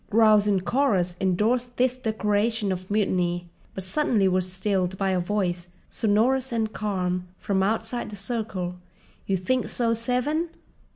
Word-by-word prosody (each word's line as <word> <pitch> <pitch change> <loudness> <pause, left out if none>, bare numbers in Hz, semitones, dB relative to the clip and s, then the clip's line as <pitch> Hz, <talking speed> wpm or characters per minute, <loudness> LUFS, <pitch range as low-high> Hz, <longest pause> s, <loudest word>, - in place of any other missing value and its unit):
Growls 215 -1 +5
in 195 -2 +2
chorus 185 -4 +1
endorsed 230 +7 +1
this 255 0 +2
declaration 220 -2 0
of 185 0 -4
mutiny; 180 -4 0 0.3
but 190 - -4
suddenly 210 -1 +2
were 185 0 +2
stilled 185 0 -1
by 195 0 +1
a 185 - +1
voice, 180 -2 -1 0.2
sonorous 240 +5 +2
and 220 -2 -1
calm, 180 -3 -2
from 195 -1 0
outside 225 +4 -1
the 210 - -7
circle: 195 -4 -3 0.5
"You 195 - +2
think 250 +8 0
so, 230 -2 +1
Seven? 250 +8 0
205 Hz, 140 wpm, -25 LUFS, 185-230 Hz, 0.5 s, Growls